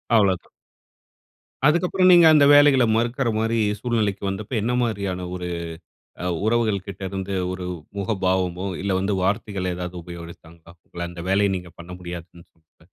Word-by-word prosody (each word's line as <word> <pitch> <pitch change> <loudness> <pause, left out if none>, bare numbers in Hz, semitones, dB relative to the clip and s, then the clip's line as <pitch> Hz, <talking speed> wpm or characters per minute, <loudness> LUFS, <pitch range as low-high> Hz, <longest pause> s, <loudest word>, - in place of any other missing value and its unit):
அவ்வளவுதா 95 -5 +2 1.2
அதுக்கப்புறம் 180 +4 +3
நீங்க 175 -2 +8
அந்த 145 -2 +6
வேலைகள 145 -3 +6
மறுக்கிற 120 +2 0
மாரி 115 +1 0 0.2
சூழ்நிலைக்கு 110 -5 -1
வந்தப்போ, 100 +5 -5
என்ன 120 +4 0
மாரியான 100 -5 -2
ஒரு 90 -1 -5 0.8
அ - - -3 0.2
உறவுகள் 110 -4 +1
கிட்ட 100 0 -8
இருந்து 95 0 -4 0.2
ஒரு 95 -1 -5 0.3
முகபாவமோ, 95 -2 -1 0.2
இல்ல 100 - -1
வந்து 100 +2 0
வார்த்தைகள் 95 -2 -1
ஏதாவது 90 0 -6
உபயோகிச்சாங்களா 85 -1 -12 0.2
உங்கள 85 0 -6
அந்த 85 -1 -8
வேலையை 100 +1 +3
நீங்க 90 -1 -10
பண்ண 85 +1 -10
முடியாதுன்னு 85 -1 -9
சொன்னப்ப. 80 -1 -30
95 Hz, 140 wpm, -23 LUFS, 90-115 Hz, 1.2 s, நீங்க